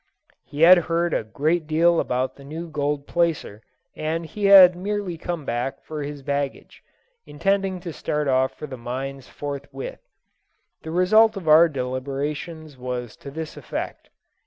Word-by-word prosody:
He 145 - -7
had 175 +2 +9
heard 170 0 +1
a - - 0
great 155 +8 -1
deal 165 +2 +3
about 125 +1 -1
the 140 - -14
new 160 +5 -6
gold 145 -1 -1
placer, 165 -12 -1 0.3
and 160 +2 -2
he 200 +6 -4
had 190 -3 +9
merely 200 -1 -3
come 165 -2 -5
back 120 +2 -3
for 155 -1 -6
his 145 -1 -6
baggage, 140 0 -4 0.5
intending 195 +3 0
to 170 -2 -6
start 150 0 -2
off 130 0 +2
for - - -7
the 130 -4 -8
mines 130 +3 -5
forthwith. 145 - -7 0.8
The 160 - -8
result 215 +6 +4
of 180 -5 -7
our 160 +2 +7
deliberations 140 +3 -4
was 125 -2 -5
to 140 - -9
this 160 +2 -6
effect. - - -6
155 Hz, 155 wpm, -23 LUFS, 135-170 Hz, 0.8 s, had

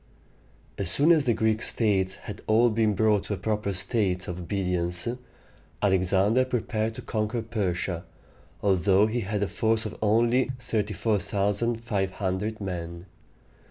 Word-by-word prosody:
As - - -1
soon 150 +4 +4
as 155 -4 +4
the 120 - +3
Greek 110 0 +1
states 95 -4 +1
had - - -9
all 115 +2 +4
been 110 -1 +1
brought 105 -1 +3
to 105 - -2
a - - -9
proper 105 +1 -1
state 95 -1 -1
of 90 0 -5
obedience, 90 -1 -1 0.7
Alexander 95 +4 +3
prepared 115 -3 -2
to - - -8
conquer 110 +1 -2
Persia, 95 -6 -2 0.6
although 95 +1 +4
he 110 +3 -1
had 105 -1 -2
a - - 0
force 110 +4 +1
of 110 - -5
only 115 +4 +3
34,500 105 -1 -1
men. 85 -3 -5
105 Hz, 130 wpm, -26 LUFS, 95-110 Hz, 0.7 s, soon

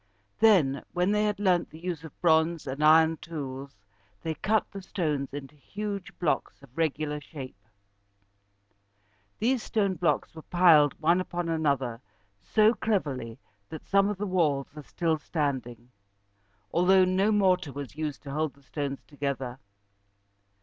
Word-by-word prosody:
Then, 170 -12 +4
when 180 +2 +1
they 210 0 +2
had 210 -1 -1
learned 185 -4 +2
the 155 - -12
use 170 -2 -5
of 160 - -12
bronze 160 -1 +3
and 140 +2 -3
iron 160 +1 +6
tools, 140 -7 -7 0.5
they 160 - -1
cut 215 +7 +1
the 195 - -7
stones 150 -7 -2
into 140 0 -8
huge 200 +5 -6
blocks 155 -4 -1
of 135 -2 -17
regular 150 -2 -1
shape. 130 - -10 1.7
These 245 +2 +1
stone 200 -3 0
blocks 175 -2 0
were 160 - -9
piled 160 -4 +4
one 170 +3 +3
upon 175 -2 -4
another 140 -7 0 0.4
so 215 +1 +4
cleverly 145 - -2 0.3
that 160 - -8
some 200 0 +3
of 210 - -3
the 205 - -2
walls 155 -8 0
are 150 - -7
still 160 +2 -1
standing, 130 -6 -3 0.8
although 185 +2 +5
no 190 +3 +2
mortar 185 -6 +2
was 140 -1 -7
used 155 -2 -4
to 140 - -7
hold 155 0 -2
the 140 - -23
stones 140 -1 -4
together. 135 -3 -4
160 Hz, 145 wpm, -28 LUFS, 140-185 Hz, 1.7 s, iron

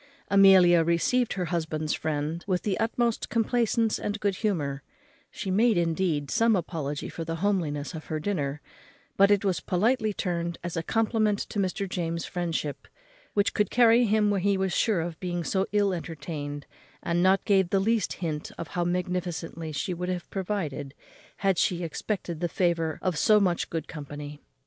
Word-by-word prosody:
Amelia 190 -4 +7
received 170 +9 +1
her 185 -2 -2
husband's 155 -2 -1
friend 155 +2 -2
with 185 -2 0
the 200 -3 -1
utmost 230 0 0
complaisance 230 0 +1
and 205 +1 -3
good 200 -3 0
humour: 145 -11 -1 0.5
she 195 - -5
made 220 +2 +3
indeed 165 -4 0
some 225 -1 +3
apology 155 -5 -3
for 165 - -6
the 165 0 -3
homeliness 165 -6 -1
of 160 -1 -7
her 155 - -3
dinner; 150 -6 -2 0.5
but 200 0 +5
it 205 0 +3
was 190 -3 +1
politely 220 +4 +1
turned 170 -3 -2
as 175 -1 -4
a 165 - 0
compliment 215 +1 +1
to 210 - -3
Mr. 195 +1 -1
James's 170 -2 -3
friendship, 165 -5 -3 0.5
which 205 0 +2
could 210 -2 +1
carry 240 0 +5
him 210 -1 +3
where 200 - +1
he 200 +1 +2
was 190 -1 -1
sure 210 -7 +2
of 165 -1 -5
being 175 -2 -3
so 190 +3 0
ill 205 -2 +2
entertained; 150 -3 -5 0.4
and 170 0 +1 0.2
gave 195 -3 +4
not - - -14
the 195 - +2
least 220 +1 +1
hint 155 -4 -4 0.2
how 175 - -1
magnificently 175 -2 -3
she 150 +5 -2
would 180 +1 -4
have 180 -1 -3
provided 170 -8 -3 0.5
_had 195 -3 +3
she 175 -1 +1
expected 170 0 -3
the 175 0 -1
favour 170 -3 0
of 185 -3 0
so 215 -2 +5
much 180 -4 0
good 165 -2 -4
company. 145 -1 -8
180 Hz, 170 wpm, -27 LUFS, 165-205 Hz, 0.5 s, Amelia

